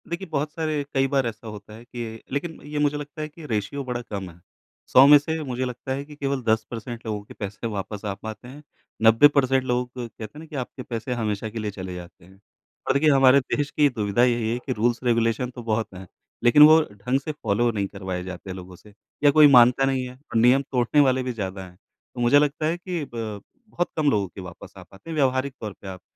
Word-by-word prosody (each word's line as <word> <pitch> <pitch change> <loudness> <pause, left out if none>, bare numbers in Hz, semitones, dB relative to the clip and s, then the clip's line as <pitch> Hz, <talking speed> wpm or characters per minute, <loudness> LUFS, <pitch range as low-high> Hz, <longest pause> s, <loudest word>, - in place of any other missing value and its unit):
देखिए, 170 +3 -4
बहुत 150 -1 -2
सारे 155 -3 -2
कई 135 0 +2
बार 135 -1 +1
ऐसा 115 0 -7
होता 105 0 -10
है 115 +2 -12
कि 115 -2 -7
लेकिन 160 +3 -4
ये 150 0 -4
मुझे 145 0 +1
लगता 145 +1 -8
है 155 - -3
कि 155 +1 -13
रेशियो 115 +3 -3
बड़ा 125 -2 -4
कम 100 -5 -6
है, 85 0 -16 0.5
100 130 - +7
में 145 +1 +10
से 160 +2 -3
मुझे 130 -2 -3
लगता 125 +1 -6
है 140 +1 -4
कि 150 0 -13
केवल 140 -2 -2
10 110 -1 +2
परसेंट 120 0 -7
लोगों 105 -2 -3
के - - -13
पैसे 105 +3 -5
वापस 105 -1 -5
आ 100 - -1
पाते 110 +4 -9
हैं, 140 +4 -12 0.4
90 115 +5 +7
परसेंट 135 -1 +3
लोग, 125 -1 -1
कहते 120 -2 -7
हैं 110 +8 -9
ना 160 - -10
कि 155 - -11
आपके 130 0 -5
पैसे 120 +1 -4
हमेशा 110 -2 -2
के 115 +1 -6
लिए 105 -1 -3
चले 95 -2 -7
जाते 85 -1 -11
हैं। 95 +2 -19 0.5
और - - +3
देखिए 145 +3 +3
हमारे 135 0 +6
देश 140 +2 -2
की 150 -1 +3
दुविधा 110 -2 0
यही 120 -2 +1
है 120 - -1
कि 130 - -1
रूल्स-रेगुलेशन 115 +1 +1
तो 125 -1 -9
बहुत 110 -2 -2
हैं, 95 0 -10 0.4
लेकिन 120 +5 +7
वो 155 +1 +9
ढँग 105 +7 -1
से 155 - -4
फॉलो 120 -5 0
नहीं 100 -3 -2
करवाए 95 -2 -5
जाते 95 +1 -7
लोगों 90 0 -10
से 105 +3 -18 0.3
या 145 - +7
कोई 150 +1 +8
मानता 125 +2 +6
नहीं 135 -1 0
है 125 - -9
और 130 -3 -6
नियम 125 +3 +5
तोड़ने 125 +3 +2
वाले 130 -2 +2
भी 125 -1 -3
ज़्यादा 95 -3 -5
हैं। 90 -1 -16 0.4
तो 120 - -4
मुझे 120 +4 +5
लगता 150 +2 0
है 165 +2 0
कि 175 -2 -4
ब 110 -3 -5 0.3
बहुत 175 - -1
कम 150 -2 +3
लोगों 100 -2 +1
के 95 +2 -11
वापस 90 -2 -11
आ - - -10
पाते 95 +12 -16
हैं, - - -4
व्यावहारिक 130 -1 +1
तौर 105 -3 -5
पे 100 - -10
आप 95 -1 -8
120 Hz, 240 wpm, -24 LUFS, 105-140 Hz, 0.5 s, में